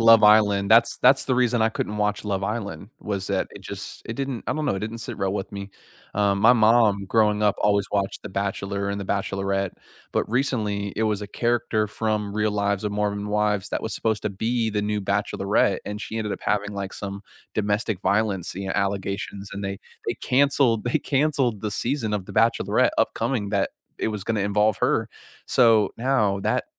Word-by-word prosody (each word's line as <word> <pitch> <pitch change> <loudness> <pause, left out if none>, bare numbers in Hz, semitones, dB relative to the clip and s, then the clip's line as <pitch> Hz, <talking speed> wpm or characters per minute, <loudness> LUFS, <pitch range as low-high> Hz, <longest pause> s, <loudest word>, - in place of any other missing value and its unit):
Love 115 -1 +7
Island, 105 -2 +5
that's 115 +1 +5
that's 135 +2 +5
the 130 - +1
reason 125 -1 +2
I 110 - +4
couldn't 105 -1 -3
watch 105 0 0
Love 100 -2 -1
Island, 100 -3 -4
was 100 -2 -3
that 100 -2 -1
it - - -12
just - - -7
it 115 - -4
didn't 135 -2 -4
I - - 0
don't 155 0 -2
know, 100 - 0
it - - -2
didn't 110 +2 -5
sit 115 - -7
well 95 -1 0
with 100 -1 -4
me. 100 0 -6 0.4
Um, 100 -1 +2
my 115 +4 +7
mom 110 -3 +4
growing 105 0 +2
up 105 -1 +3
always 100 -1 +2
watched 100 -1 -1
The - - -6
Bachelor 100 0 -2
and 100 0 -3
The - - -4
Bachelorette, 95 -1 -1 0.4
but, - - 0
recently 105 -6 -1
it 110 - 0
was 105 -2 0
a - - -5
character 120 0 0
from 105 -1 -2
Real 105 0 +1
Lives 100 -1 0
of 105 - -1
Mormon 105 0 -1
Wives 105 -1 0
that - - -2
was 110 - -3
supposed 110 -2 -1
to - - -1
be 115 +3 -1
the 105 -1 -1
new 105 0 -1
Bachelorette, 100 0 +1
and 105 0 -5
she 110 - -5
ended 105 -2 -2
up - - -5
having, 105 0 0
like, 100 -1 -5
some 100 0 -6 0.3
domestic 105 -1 0
violence, 100 -3 0
you 95 +1 -5
know, - - -1
allegations, 100 0 -2
and 100 0 -5
they 100 0 -3 0.3
they - - 0
canceled 130 -4 +2
they 120 - +1
canceled 135 -6 +1
the 105 - -3
season 120 -1 -1
of 100 -3 -3
The - - -8
Bachelorette 115 +2 +3
upcoming 115 -7 0
that 100 -2 +1 0.3
it - - 0
was 105 -2 -4
gonna 110 -2 0
involve 105 +1 +2
her, - - +1 0.4
so 115 -4 +4
now 115 -6 +2
that, - - 0
105 Hz, 205 wpm, -24 LUFS, 100-110 Hz, 0.4 s, Love